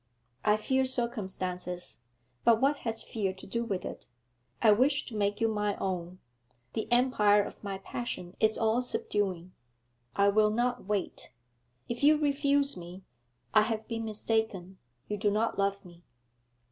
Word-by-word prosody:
I 210 0 +4
fear 265 +5 +1
circumstances; 185 - -2 0.4
but 230 -1 +5
what 280 +3 +3
has 225 -4 -2
fear 200 -4 -2
to 190 - -10
do 235 +4 -2
with 200 -5 -3
it; - - -7 0.5
I 220 - +6
wish 270 +6 +3
to 235 - -8
make 205 0 0
you 225 - +3
my 210 -2 0
own; 180 -1 -3 0.6
the 220 - -3
empire 215 -5 +4
of - - -10
my 200 -1 -3
passion 195 -3 -5
is 220 0 +3
all 225 +2 +2
subduing. 190 -7 -2 0.6
I 200 0 +4
will 210 +1 +4
not 245 +2 0
wait! 205 -2 -3 0.6
If 235 - -4
you 300 +2 +6
refuse 285 -1 +2
me, 180 +1 -9 0.5
I 215 - +7
have 220 0 -2
been 230 -1 -3
mistaken; 215 -4 -2 0.3
you 210 - -2
do 205 +1 +2
not 215 +1 0
love 200 0 0
me.' 175 -1 -14
215 Hz, 155 wpm, -30 LUFS, 195-235 Hz, 0.6 s, I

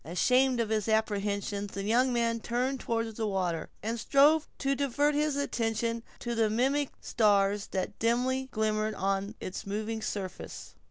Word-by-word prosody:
Ashamed 250 - +2
of 230 -2 0
his 215 -1 0
apprehensions, 205 -2 -1
the 195 - -3
young 245 +5 +3
man 230 -1 +1
turned 250 +4 -1
toward 230 -2 -2
the 220 -1 -1
water, 180 -5 -1
and 230 +2 -2
strove 290 +6 +4
to 275 0 0
divert 285 +2 +1
his 300 0 +1
attention 230 -4 -1 0.2
to 240 - -2
the 225 -2 +2
mimic 270 +6 +1
stars 205 -2 +2
that 190 +1 -3
dimly 255 +3 +1
glimmered 215 0 0
on 195 +2 -1
its 185 - -6
moving 215 +2 -3
surface. 195 -3 -5
225 Hz, 155 wpm, -30 LUFS, 205-255 Hz, 0.2 s, strove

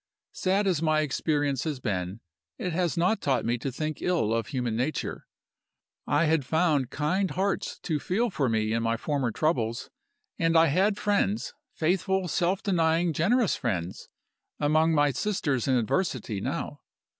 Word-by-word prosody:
"Sad 195 +2 +1
as 180 -6 +1
my 155 -1 +2
experience 145 -2 0
has 150 -4 -3
been, 95 -2 -3 0.4
it 180 - -3
has 170 -4 0
not 185 +6 +2
taught 135 -4 +1
me 120 +1 0
to 135 +3 -3
think 155 +3 -4
ill 165 -12 +1
of 115 0 -1
human 125 -5 -2
nature. 130 +7 -3 0.8
I 170 - +3
had 155 -2 +2
found 150 -2 +1
kind 180 +8 0
hearts 195 0 -1
to 155 -3 -1
feel 220 - 0
for 140 -7 0
me 110 -1 0
in 115 - 0
my 115 0 0
former 140 -1 -1
troubles; 115 -3 -1 0.5
and 165 0 +3
I 165 - +7
had 195 +7 +2
friends 165 - 0 0.2
faithful, 185 +3 +1
self 175 +3 0
denying, 165 -3 +2
generous 215 - +2
friends 90 -6 -3 0.5
among 155 +2 +3
my 145 -1 +4
sisters 145 - -1
in 130 - +3
adversity 120 - -1
now. - - -4
155 Hz, 155 wpm, -27 LUFS, 125-180 Hz, 0.8 s, I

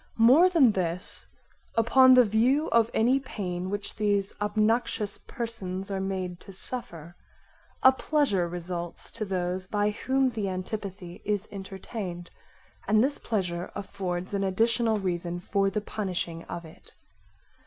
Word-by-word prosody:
More 260 +11 +7
than 305 -10 +5
this 180 -2 -3 0.5
upon 255 +3 +6
the 250 - +8
view 245 +9 +2
of 230 -1 +4
any 245 +5 +3
pain 185 -8 -4
which 205 0 -4
these 205 -2 +1
obnoxious 215 0 0
persons 200 -6 -5
are 195 - -1
made 185 -2 -3
to 200 - -12
suffer, 180 -6 0 0.7
a 260 - +9
pleasure 265 - +1
results 175 0 -5
to 215 - -4
those 185 -1 -2
by 205 +1 +1
whom 265 +4 +1
the 215 -4 -2
antipathy 185 -1 -6
is 205 0 -1
entertained, 190 -2 -6 0.6
and 215 +2 +4
this 280 +2 0
pleasure 180 -5 -2
affords 185 -2 -4
an 200 0 0
additional 225 +3 +2
reason 175 -2 -2
for 195 +2 +1
the 210 +2 -2
punishing 180 -5 -4
of 170 -1 -6
it. 160 - -15
200 Hz, 135 wpm, -27 LUFS, 180-230 Hz, 0.7 s, a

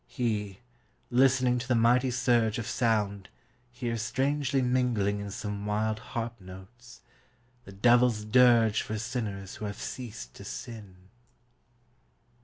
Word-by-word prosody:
He, 105 -6 -3 0.5
listening 125 0 +3
to 125 - -6
the 125 - +2
mighty 120 +3 +3
surge 120 -3 +2
Of 115 - -4
sound, 105 -5 0 0.4
hears 120 -3 -3
strangely 135 +4 0
mingling 125 -5 +1
in 100 0 -5
Some 105 0 -5
wild 110 +1 0
harp 115 0 -5
notes: 95 +7 -13 0.6
The - - -11
devil's 120 +1 +3
dirge 115 -2 +5
For 110 - -4
sinners 105 -4 -4
who 105 - -5
have 105 0 -6
ceased 100 - -7
to - - -12
sin. 100 - -8
115 Hz, 125 wpm, -28 LUFS, 105-125 Hz, 0.6 s, dirge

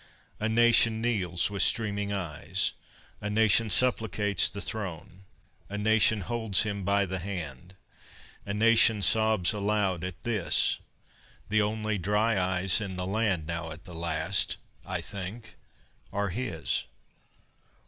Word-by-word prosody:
A 110 - -1
nation 115 -1 +4
kneels 100 -7 0
with 100 -2 -1
streaming 100 -1 +1
eyes, 90 -7 -2 0.5
A 105 - -3
nation 110 +1 +3
supplicates 105 -5 +1
the 100 - -7
throne, 95 -1 -6 0.4
A 105 - -5
nation 110 0 +3
holds 110 -1 0
him 100 -2 -3
by 100 +1 +2
the 95 0 -4
hand, 85 -3 -6 0.7
A - - -5
nation 115 -1 +4
sobs 110 -4 +3
aloud 100 -4 0
at 95 -1 -6
this: 110 -7 +1 0.7
The 110 +1 +3
only 110 0 -1
dry 105 +5 +1
eyes 95 +2 +1
in 95 -3 -5
the 90 0 -3
land 95 -4 0
Now 85 0 -4
at 80 +2 -9
the 90 - -11
last, 85 +3 +1 0.3
I - - -2
think, 100 +4 -7 0.6
are 100 0 -1
his. 90 - -2
100 Hz, 130 wpm, -28 LUFS, 90-110 Hz, 0.7 s, nation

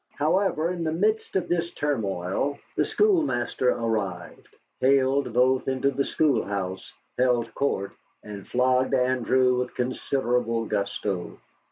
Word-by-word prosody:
However, 165 +1 +1
in 175 -2 -3
the 160 - -1
midst 215 +7 0
of 190 - 0
this 170 -1 0
turmoil 110 -1 -1 0.2
the - - +2
schoolmaster 310 - +1
arrived, 105 -7 -3 0.3
haled 135 0 +2
both 125 +2 +2
into 135 +1 +1
the 140 +1 0
schoolhouse, 100 -12 -1 0.3
held 125 -2 +1
court, 100 -8 -1 0.3
and 105 -2 -9
flogged 130 +1 +2
Andrew 125 0 +2
with 125 - -4
considerable 125 -2 -1
gusto. 100 -3 -3
125 Hz, 120 wpm, -25 LUFS, 115-140 Hz, 0.3 s, the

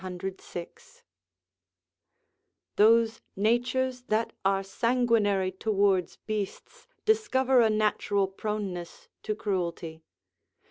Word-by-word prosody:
] - - -15 2.7
Those 225 +1 +4
natures 245 +4 +1
that 220 +2 0
are 195 0 +2
sanguinary 220 -3 +1
towards 195 -2 +1
beasts 210 - -6 0.2
discover 265 - +3
a 225 - +4
natural 210 -2 +1
proneness 195 -3 -5
to 215 - -2
cruelty. 170 -6 -3
215 Hz, 80 wpm, -28 LUFS, 195-230 Hz, 2.7 s, Those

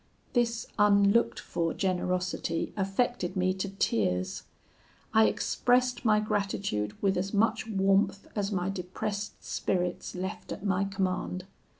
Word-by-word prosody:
"This 235 -2 +1
unlooked 205 +2 +4
for 165 -1 -2
generosity 180 -2 -1
affected 195 -1 0
me 185 0 +2
to 190 +1 -3
tears. 95 - 0 0.7
I 220 0 +6
expressed 250 0 +1
my 215 -3 +4
gratitude 195 - -1
with 195 -2 +3
as 195 +3 -2
much 225 +2 +2
warmth 195 -1 +2
as 205 -1 -1
my 185 -1 0
depressed 200 +3 -4
spirits 180 -1 -2
left 185 +1 -5
at 195 - -6
my 195 0 +2
command. 185 -2 -2
195 Hz, 120 wpm, -29 LUFS, 185-210 Hz, 0.7 s, I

